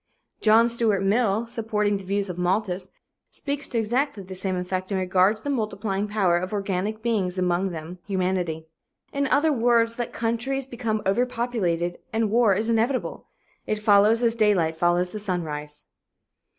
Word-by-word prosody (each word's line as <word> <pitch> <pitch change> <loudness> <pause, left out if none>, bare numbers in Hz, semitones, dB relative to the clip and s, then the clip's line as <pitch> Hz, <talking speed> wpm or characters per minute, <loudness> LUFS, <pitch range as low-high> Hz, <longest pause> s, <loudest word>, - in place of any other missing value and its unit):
John 225 +2 +5
Stuart 230 -4 +1
Mill, 215 +1 +2
supporting 215 -3 -1
the 195 - -9
views 200 +1 -1
of 180 -1 -6
Malthus, 185 0 -1 0.4
speaks 285 0 -4
to 240 - -3
exactly 230 0 0
the 190 +1 -9
same 185 0 -2
effect 185 +1 -3
in 195 - +1
regard 185 +2 +3
to 215 - -14
the 285 - -1
multiplying 210 -4 -2
power 190 -5 +2
of 185 +1 -5
organic 200 +2 -2
beings, 195 -6 0
among 180 +1 +1
them 170 +1 -7
humanity. 180 -4 -1 0.5
In 280 -1 0
other 295 +3 +3
words, 230 -1 +2
let 240 - -2
countries 240 +4 -2
become 230 -4 -3
overpopulated 200 -6 0
and 220 -2 0
war 225 -4 +4
is 215 +3 -1
inevitable. 230 +3 0 0.4
It 215 - 0
follows 210 +2 +4
as 230 -1 +3
daylight 200 -8 +2
follows 175 +2 +1
the 215 - -5
sunrise. 150 -7 -4
205 Hz, 160 wpm, -25 LUFS, 185-230 Hz, 0.5 s, John